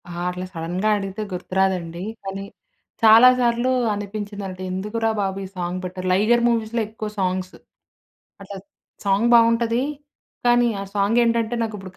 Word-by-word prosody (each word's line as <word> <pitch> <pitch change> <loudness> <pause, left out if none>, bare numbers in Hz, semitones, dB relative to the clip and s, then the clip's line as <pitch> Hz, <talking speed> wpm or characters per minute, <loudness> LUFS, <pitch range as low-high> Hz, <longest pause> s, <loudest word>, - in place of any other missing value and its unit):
ఆ! - - -8 0.2
అట్లా 180 +1 -5
సడన్‌గా 175 +5 -2
అడిగితే 195 +1 -5
గుర్తు 180 +1 -7
రాదండి. 180 -3 0 0.2
కానీ 195 0 -5 0.6
చాలా 225 +3 +9
సార్లు 240 +1 +1 0.2
అనిపించిందన్న‌ట్టు 205 -2 -6
ఎందుకురా 210 +4 -1
బాబు 195 -1 -2
ఈ - - -7
సాంగ్ 180 +1 -3
పెట్టరు. 185 0 -5
'లైగర్' 220 +6 +3
మూవీస్‌లో 230 0 0
ఎక్కువ 215 -1 -6
సాంగ్స్. 185 0 -2 0.9
అట్ల 195 0 -9 0.5
సాంగ్ 200 +4 +2
బావుంటది. 230 +1 +3 0.6
కానీ 240 0 +4
ఆ - - -3
సాంగ్ 205 +3 +2
ఏంటంటే 230 0 0
నాకుప్పుడు 205 -4 -6
205 Hz, 135 wpm, -22 LUFS, 185-230 Hz, 0.9 s, చాలా